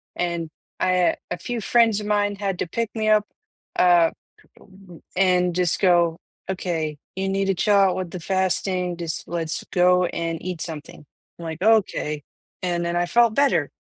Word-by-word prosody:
and 170 Hz, -2 st, -2 dB, 0.3 s
I 185 Hz, 0 st, +2 dB
uh -, -, +3 dB, 0.2 s
a -, -, -2 dB
few 240 Hz, +5 st, -4 dB
friends 225 Hz, -1 st, +3 dB
of 210 Hz, -, -6 dB
mine 205 Hz, -1 st, +1 dB
had 195 Hz, -2 st, -2 dB
to -, -, -1 dB
pick 230 Hz, +5 st, -2 dB
me 215 Hz, -1 st, 0 dB
up, 215 Hz, -1 st, +4 dB, 0.5 s
uh 175 Hz, -2 st, +5 dB, 1.0 s
and 180 Hz, -2 st, +2 dB
just 180 Hz, -2 st, +1 dB
go, 175 Hz, -3 st, +3 dB, 0.3 s
"Okay, 165 Hz, -5 st, -2 dB, 0.2 s
you 190 Hz, +1 st, -2 dB
need 195 Hz, 0 st, 0 dB
to 195 Hz, 0 st, +1 dB
chill 205 Hz, +4 st, +2 dB
out 195 Hz, -2 st, +4 dB
with 185 Hz, -2 st, -4 dB
the 180 Hz, -, -6 dB
fasting, 185 Hz, 0 st, -1 dB
just 165 Hz, -2 st, -4 dB
let's 165 Hz, -2 st, -3 dB
go 180 Hz, 0 st, +4 dB
and 165 Hz, -1 st, -3 dB
eat 180 Hz, -3 st, -5 dB
something," 150 Hz, -2 st, -7 dB, 0.3 s
I'm 170 Hz, -, -7 dB
like, 160 Hz, 0 st, -6 dB
"Okay," 190 Hz, -8 st, +2 dB, 0.4 s
and 175 Hz, -1 st, -1 dB
then 170 Hz, 0 st, -2 dB
I 175 Hz, 0 st, +1 dB
felt 235 Hz, +5 st, +3 dB
better. 280 Hz, -1 st, +2 dB
180 Hz, 175 wpm, -23 LUFS, 170-195 Hz, 1.0 s, uh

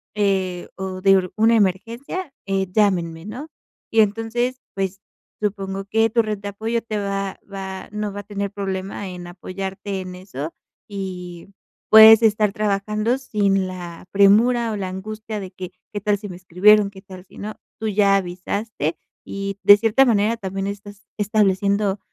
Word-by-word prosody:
eh, 190 Hz, -3 st, 0 dB
o 190 Hz, -1 st, -5 dB
de 190 Hz, -1 st, +4 dB
una 225 Hz, +2 st, +4 dB
emergencia, 230 Hz, -, -1 dB
eh, 195 Hz, -1 st, 0 dB
llámenme, 175 Hz, -5 st, +1 dB
¿no? 255 Hz, +9 st, -7 dB, 0.4 s
Y 225 Hz, -, +4 dB
entonces, 225 Hz, +4 st, +1 dB
pues, 195 Hz, 0 st, -3 dB, 0.4 s
supongo 195 Hz, -2 st, -3 dB
que 225 Hz, +3 st, +2 dB
tu 230 Hz, +2 st, +3 dB
red 215 Hz, -1 st, -3 dB
de 205 Hz, -, -7 dB
apoyo 225 Hz, +3 st, -2 dB
te 220 Hz, -2 st, -4 dB
va 195 Hz, -1 st, -3 dB
va 190 Hz, -1 st, -6 dB
no 210 Hz, -1 st, -3 dB
va 205 Hz, -, -5 dB
a -, -, -18 dB
tener 200 Hz, -1 st, -4 dB
problema 195 Hz, 0 st, -4 dB
en 180 Hz, -1 st, -8 dB
apoyarte 190 Hz, +2 st, -5 dB
en 185 Hz, -1 st, -8 dB
eso 170 Hz, -5 st, -7 dB, 0.3 s
y 180 Hz, -3 st, -7 dB, 0.4 s
puedes 220 Hz, 0 st, +10 dB
estar 215 Hz, -2 st, +3 dB
trabajando 210 Hz, +3 st, 0 dB
sin 200 Hz, -7 st, 0 dB
la 175 Hz, -2 st, -8 dB
premura 225 Hz, +4 st, +4 dB
o 210 Hz, -, -3 dB
la 195 Hz, -2 st, -3 dB
angustia 215 Hz, +3 st, -6 dB
de 185 Hz, -1 st, -8 dB
que, 185 Hz, -1 st, -8 dB, 0.2 s
¿qué 205 Hz, -, -2 dB
tal 205 Hz, 0 st, +1 dB
si 205 Hz, 0 st, -8 dB
me 180 Hz, -, -8 dB
escribieron, 200 Hz, +3 st, +4 dB
qué 195 Hz, -1 st, -14 dB
tal 190 Hz, -2 st, -12 dB
si -, -, -18 dB
no? 210 Hz, +1 st, -6 dB, 0.3 s
Tú 220 Hz, -, -1 dB
ya 200 Hz, -1 st, +4 dB
avisaste 180 Hz, -2 st, -3 dB, 0.3 s
y 195 Hz, 0 st, -4 dB
de 205 Hz, -, +10 dB
cierta 225 Hz, +5 st, +4 dB
manera 225 Hz, -1 st, +2 dB
también 195 Hz, -2 st, -4 dB
estás 205 Hz, 0 st, -8 dB
estableciendo, 200 Hz, -1 st, +1 dB
200 Hz, 165 wpm, -22 LUFS, 190-215 Hz, 0.4 s, puedes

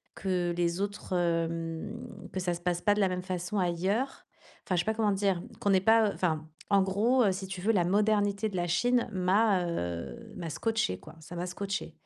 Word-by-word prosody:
que 180 Hz, -2 st, 0 dB
les 175 Hz, +1 st, 0 dB
autres 205 Hz, -1 st, -4 dB
hem, 170 Hz, +6 st, -2 dB
que 190 Hz, -, -2 dB
ça 175 Hz, -1 st, 0 dB
se 170 Hz, -, -6 dB
passe 175 Hz, -1 st, 0 dB
pas 205 Hz, -, +4 dB
de 210 Hz, -, +1 dB
la 190 Hz, -, +3 dB
même 180 Hz, 0 st, -2 dB
façon 185 Hz, +2 st, -3 dB
ailleurs. 190 Hz, +9 st, -1 dB, 0.4 s
Enfin, 185 Hz, -, 0 dB
je 175 Hz, -, +2 dB
sais -, -, -7 dB
pas 220 Hz, -, +1 dB
comment 215 Hz, -2 st, +1 dB
dire. 195 Hz, -3 st, +1 dB, 0.2 s
Qu'on 205 Hz, -, 0 dB
n'est 190 Hz, -1 st, +4 dB
pas 220 Hz, 0 st, +5 dB
enfin 160 Hz, -3 st, -1 dB, 0.2 s
en 200 Hz, -1 st, +5 dB
gros 220 Hz, +7 st, +3 dB
heu, 195 Hz, -, +4 dB
si 190 Hz, 0 st, -5 dB
tu 185 Hz, -1 st, -6 dB
veux, 220 Hz, +4 st, +3 dB
la 180 Hz, -4 st, +3 dB
modernité 205 Hz, +1 st, +2 dB
de 190 Hz, -, -7 dB
la 175 Hz, 0 st, 0 dB
Chine 245 Hz, +8 st, +2 dB
m'a 190 Hz, 0 st, +3 dB
heu, 85 Hz, -, -4 dB
m'a 165 Hz, -2 st, -4 dB
scotché 190 Hz, -, -1 dB
quoi, -, -, -13 dB
ça 165 Hz, +3 st, -10 dB
m'a 175 Hz, +1 st, -2 dB
scotché. 195 Hz, +2 st, -4 dB
185 Hz, 215 wpm, -30 LUFS, 175-205 Hz, 0.4 s, pas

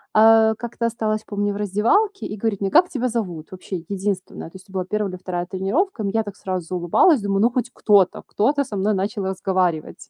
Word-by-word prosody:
э, 220 Hz, 0 st, +6 dB
как-то 235 Hz, 0 st, -4 dB
осталась, 220 Hz, -1 st, -1 dB
помню, 205 Hz, 0 st, -2 dB
в -, -, -7 dB
раздевалке 230 Hz, -, +1 dB
и 210 Hz, -, -6 dB
говорит 205 Hz, -2 st, -2 dB
мне: 195 Hz, -, 0 dB
"Как 350 Hz, -, +5 dB
тебя 255 Hz, -6 st, -1 dB
зовут?" 180 Hz, -9 st, -4 dB
Вообще, 185 Hz, 0 st, -6 dB
единственная, 195 Hz, -4 st, -4 dB
то -, -, -21 dB
есть 190 Hz, +2 st, -19 dB
это 195 Hz, -, -16 dB
была 185 Hz, -1 st, -2 dB
1 210 Hz, +1 st, -1 dB
или 185 Hz, -, -7 dB
2 175 Hz, -1 st, -4 dB
тренировка. 215 Hz, -, -1 dB
М, 200 Hz, -, -1 dB
я 225 Hz, +2 st, +1 dB
так 205 Hz, -3 st, -7 dB
сразу 185 Hz, -3 st, -4 dB
заулыбалась, 190 Hz, -, +3 dB
думаю: 195 Hz, -1 st, 0 dB
"Ну 235 Hz, -, +5 dB
хоть 245 Hz, -1 st, -2 dB
кто-то, 200 Hz, -4 st, +3 dB
кто-то 280 Hz, +7 st, +1 dB
со 210 Hz, -6 st, -6 dB
мной 205 Hz, +2 st, +1 dB
начал 200 Hz, +1 st, -2 dB
разговаривать". 185 Hz, -4 st, -2 dB
205 Hz, 215 wpm, -22 LUFS, 190-225 Hz, -, э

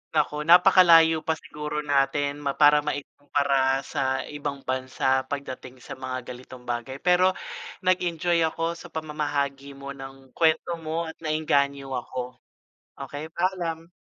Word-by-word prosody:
Naku, -, -, +2 dB
napakalayo 170 Hz, -2 st, +7 dB
pa 160 Hz, -, +2 dB
siguro 150 Hz, -1 st, -5 dB
natin 145 Hz, 0 st, +1 dB
ma 140 Hz, -1 st, -2 dB
para 150 Hz, 0 st, +6 dB
maib 145 Hz, -1 st, -3 dB, 0.2 s
kumpara 140 Hz, -2 st, +1 dB
sa 130 Hz, -1 st, -1 dB
ibang 145 Hz, -2 st, -6 dB
bansa 130 Hz, 0 st, 0 dB
pagdating 130 Hz, -2 st, -7 dB
sa -, -, -9 dB
mga 130 Hz, -1 st, -5 dB
ganitong 125 Hz, 0 st, -11 dB
bagay. 120 Hz, +2 st, -4 dB
Pero 180 Hz, +1 st, +4 dB, 0.5 s
nag-enjoy 175 Hz, -2 st, +1 dB
ako 165 Hz, +1 st, -2 dB
sa 175 Hz, -, -10 dB
pamamahagi 145 Hz, -3 st, -3 dB
mo 140 Hz, 0 st, -8 dB
ng 135 Hz, -1 st, -11 dB
kuwento 165 Hz, +1 st, +1 dB
mo 160 Hz, +1 st, -3 dB
at -, -, -22 dB
naengganyo 140 Hz, -3 st, 0 dB
ako, 125 Hz, 0 st, -5 dB, 0.6 s
okey, 145 Hz, +3 st, -6 dB
paalam. 170 Hz, -2 st, -2 dB
145 Hz, 135 wpm, -25 LUFS, 135-160 Hz, 0.6 s, napakalayo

